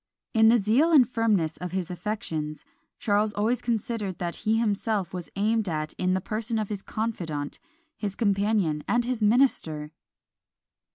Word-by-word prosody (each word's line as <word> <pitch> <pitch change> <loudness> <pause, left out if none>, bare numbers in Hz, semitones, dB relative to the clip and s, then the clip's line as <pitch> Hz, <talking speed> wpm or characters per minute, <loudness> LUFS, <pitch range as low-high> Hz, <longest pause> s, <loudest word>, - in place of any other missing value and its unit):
In 220 -1 +6
the 235 +2 +6
zeal 235 - +3
and 270 -7 +7
firmness 210 -10 +1
of 180 -1 -6
his 185 -2 -2
affections, 165 -6 -4 0.3
Charles 210 0 +1
always 220 +4 0
considered 220 -5 -2
that 170 -1 -3
he 220 +1 +1
himself 210 -4 0
was 180 -2 -5
aimed 215 0 +1
at 155 -1 -3
in 185 0 0
the - - +1
person 225 +3 -3
of 215 -2 -2
his 205 -2 -3
confidant, 170 -12 -4 0.4
his 200 -2 -3
companion, 200 -7 +1
and 240 0 +2
his 245 -2 -2
minister! 205 - +2
210 Hz, 155 wpm, -26 LUFS, 180-225 Hz, 0.4 s, and